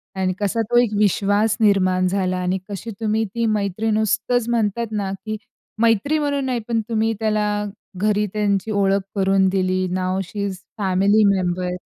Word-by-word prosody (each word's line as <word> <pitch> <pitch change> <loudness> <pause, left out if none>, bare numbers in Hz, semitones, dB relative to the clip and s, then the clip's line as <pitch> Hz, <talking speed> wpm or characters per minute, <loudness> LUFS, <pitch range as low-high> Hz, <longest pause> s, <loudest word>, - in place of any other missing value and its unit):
आणि 185 -1 0
कसा 210 +2 0
तो 240 - +4
एक 230 -3 -1
विश्वास 205 +1 +2
निर्माण 185 -3 +3
झाला. 185 -1 0
आणि 180 +1 -1
कशी 205 +3 -6
तुम्ही 220 0 0
ती 230 0 0
मैत्री 215 0 0
नुसतंच 220 +3 +1
म्हणतात 230 0 0
ना, 200 -3 -2
की 215 0 -3 0.4
मैत्री 230 +7 +3
म्हणून 285 -2 -1
नाही, 255 -2 -1
पण 230 -1 0
तुम्ही 225 0 +1
त्याला 215 -1 +1 0.5
घरी 210 +2 +1
त्यांची 210 0 0
ओळख 200 -1 +2
करून 195 -1 +3
दिली. 185 -1 0
नाऊ 185 +1 -1
शी 200 +3 -4
इस 195 -2 -4 0.2
फॅमिली 200 +2 +3
मेंबर. 180 -1 -1
205 Hz, 160 wpm, -21 LUFS, 190-220 Hz, 0.5 s, तो